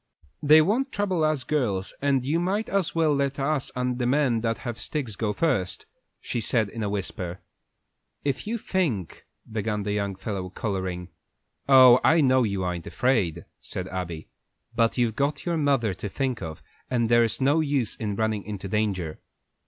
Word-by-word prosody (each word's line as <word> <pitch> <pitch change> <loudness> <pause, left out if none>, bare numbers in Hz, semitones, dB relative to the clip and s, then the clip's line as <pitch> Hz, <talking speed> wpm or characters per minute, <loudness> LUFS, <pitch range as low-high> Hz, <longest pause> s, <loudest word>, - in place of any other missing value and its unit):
"They 155 +1 +7
won't 250 - 0
trouble 190 -5 0
us 155 -3 +1
girls, 115 -10 -1
and 135 -2 +1
you 155 +5 +1
might 195 +5 -1
as 195 -4 0
well 160 -2 +3
let 140 -1 0
us 140 0 -1
and 125 0 -1
the 120 - +1
men 130 -4 +2
that 115 0 0
have 120 -2 -6
sticks 130 -9 -3
go 105 -1 -1
first," 105 - -1 0.3
she 120 - -3
said 110 -2 +1
in 115 +2 -6
a 105 - -1
whisper. 95 -3 -4 0.9
"If 140 +7 -1
you 235 +2 -1
think 150 - -2
" - - -23
began 105 -1 -1
the 105 - -2
young 100 -2 -1
fellow, 95 -1 -4
coloring. 95 -3 -3 0.6
"Oh, 130 -2 +9
I 165 - +5
know 130 -2 +4
you 100 -5 -1
ain't 90 -2 -4
afraid," 100 -11 0
said 90 - -5
Abby, 85 -3 -5 0.5
"but 115 +1 +2
you've 120 -3 +1
got 140 +2 -1
your 170 -1 0
mother 135 -9 +2
to 100 +3 -6
think 130 +1 -2
of, 80 -3 -7 0.3
and 120 -2 +1
there's 120 -1 +3
no 140 +4 +3
use 140 -7 0
in 105 -3 -3
running 110 -1 0
into 100 -1 -6
danger." 95 -6 -1
120 Hz, 175 wpm, -26 LUFS, 100-145 Hz, 0.9 s, Oh